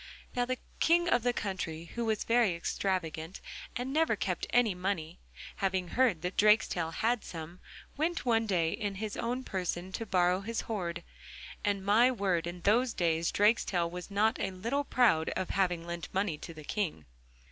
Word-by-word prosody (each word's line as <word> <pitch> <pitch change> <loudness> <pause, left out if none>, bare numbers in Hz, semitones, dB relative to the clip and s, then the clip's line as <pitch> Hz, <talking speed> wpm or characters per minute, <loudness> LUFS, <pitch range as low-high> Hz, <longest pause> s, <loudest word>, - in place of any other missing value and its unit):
Now 245 0 +2
the 255 +1 -2 0.2
King 345 +1 +4
of 245 -8 +3
the 245 +2 +2
country, 175 -7 -4
who 235 0 -2
was 220 -1 0
very 230 -6 +3
extravagant 170 -1 -2 0.4
and 255 +2 -3
never 320 +2 +3
kept - - -2
any 240 -5 +3
money, 180 -3 -3 0.4
having 190 -2 0
heard 235 -10 +2
that 180 +2 -3
Drakestail 210 -5 +4
had 230 +6 0
some, 165 +1 -8 0.4
went 330 +2 -1
one 225 -2 +2
day 170 -5 +2
in 205 -3 -3
his 210 +1 -4
own 245 +2 -2
person 185 -3 -3
to 225 +4 -4
borrow 180 -1 +3
his 225 +3 -3
hoard, 170 -6 -4 0.6
and, 200 -2 0
my 225 +5 +5
word, 190 -8 0
in 175 0 -6
those 235 +6 +3
days 165 -1 +1
Drakestail 200 -5 +2
was 180 +1 -7
not 215 +4 +2
a 195 - 0
little 230 +10 -2
proud 220 -14 +3
of 185 - -2
having 180 -3 0
lent 170 -2 -6
money 195 -3 0
to - - -8
the 155 - -9
King. 165 - -2
195 Hz, 175 wpm, -31 LUFS, 175-230 Hz, 0.6 s, my